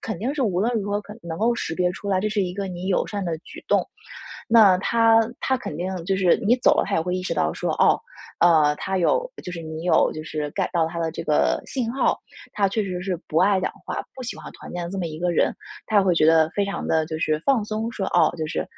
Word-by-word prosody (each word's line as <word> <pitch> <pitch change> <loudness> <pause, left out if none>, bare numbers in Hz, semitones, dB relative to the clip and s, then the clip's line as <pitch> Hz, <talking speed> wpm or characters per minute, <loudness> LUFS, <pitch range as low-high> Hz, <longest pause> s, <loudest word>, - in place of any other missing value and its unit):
肯 220 - -5
定 255 +8 -2
是 295 - -3
无 185 -6 0
论 235 +4 +1
如 205 - -4
何 205 - +1
可 210 - -11
能 165 -1 -6
够 235 +3 +2
识 165 -8 -3
别 180 0 +1
出 200 +2 -7
来， 190 -1 +2
这 215 - 0
是 210 -2 0
一 180 -1 -3
个 200 0 -3
你 180 +1 -6
友 190 - +1
善 205 -2 -4
的 165 -2 -2
举 165 - -12
动。 - - +2 0.6
那 215 -5 +6
他 225 +3 +4 0.2
他 265 - +1
肯 150 - -6
定 185 +3 -3
就 195 - +1
是 185 -2 +4
你 240 +3 +5
走 245 - +4
了， - - +2
他 - - -1
也 - - +2
会 180 +2 -2
意 185 - -2
识 - - -2
到 - - +1
说， - - -2
哦， - - +3 0.4
呃， 155 -4 +5
他 190 +4 -3
有 - - +1
就 180 - -7
是 170 - -6
你 160 0 -6
有 180 - +3
就 155 - -5
是 150 -2 -4
get - - -1
到 165 -2 +2
他 170 +1 -5
的 165 -1 -1
这 - - -6
个 150 - +2
信 240 -3 -2
号， 270 - +1 0.4
他 200 - +2
确 215 +2 -1
实 180 -2 -4
是 185 -3 -2
不 155 - -4
爱 190 +1 +4
讲 - - -1
话， - - -3
不 260 - -8
喜 245 - -5
欢 - - -9
团 - - -11
建 175 0 -4
的 170 - -6
这 195 - -5
么 180 - -2
一 155 -1 -7
个 175 0 0
人。 170 - +1 0.3
他 215 - 0
也 - - +5
会 185 -2 +2
觉 155 - +3
得 160 0 +5
非 200 +3 0
常 200 - -4
地 160 -1 +2
就 160 -1 -4
是 155 -1 0
放 260 -6 +2
松 220 +2 -3
说， 195 -4 -3
“哦 160 - +4
就 155 - -2
是 165 - -2
185 Hz, 305 characters per minute, -23 LUFS, 165-210 Hz, 0.6 s, 那